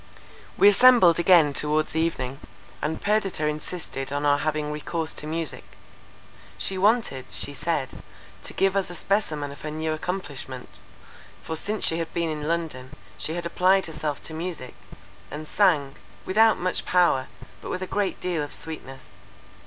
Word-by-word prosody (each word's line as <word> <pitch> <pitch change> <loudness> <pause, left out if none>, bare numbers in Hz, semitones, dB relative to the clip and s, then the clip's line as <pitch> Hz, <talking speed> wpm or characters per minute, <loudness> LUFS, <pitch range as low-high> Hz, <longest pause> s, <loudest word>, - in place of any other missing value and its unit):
We - - +7
assembled 205 -5 +7
again 170 -5 +5
towards 150 +2 0
evening, 140 -5 -1 0.4
and 160 +1 -2
Perdita 200 -6 0
insisted 150 -2 -4
on 145 +1 -1
our 145 0 +4
having 150 -1 -1
recourse 160 +2 -2
to 150 - -6
music. 160 0 -4 0.9
She 195 - 0
wanted, 195 - +2
she 145 - -1
said, 150 -2 -2 0.4
to - - -6
give 195 0 +2
us 195 -2 0
a 175 - -7
specimen 155 -8 -1
of 140 - -11
her 155 - -4
new 155 +1 -2
accomplishment; 145 -7 -6 0.6
for 160 - -4
since 210 +6 -1
she 165 - +2
had 165 - -3
been 170 -1 0
in 150 -1 -4
London, 150 -5 -3 0.2
she 155 +11 -2
had 175 0 -4
applied 185 +3 +3
herself 150 -3 -4
to 160 - -4
music, 160 -6 -5 0.6
and 155 +1 -7
sang, 150 -9 +2 0.3
without 220 +3 +4
much 180 +1 -1
power, 175 -8 +3 0.3
but - - -7
with 185 - -3
a - - -2
great 195 0 -1
deal 175 -4 -1
of 145 - -4
sweetness. 135 -4 -4
160 Hz, 160 wpm, -25 LUFS, 150-185 Hz, 0.9 s, We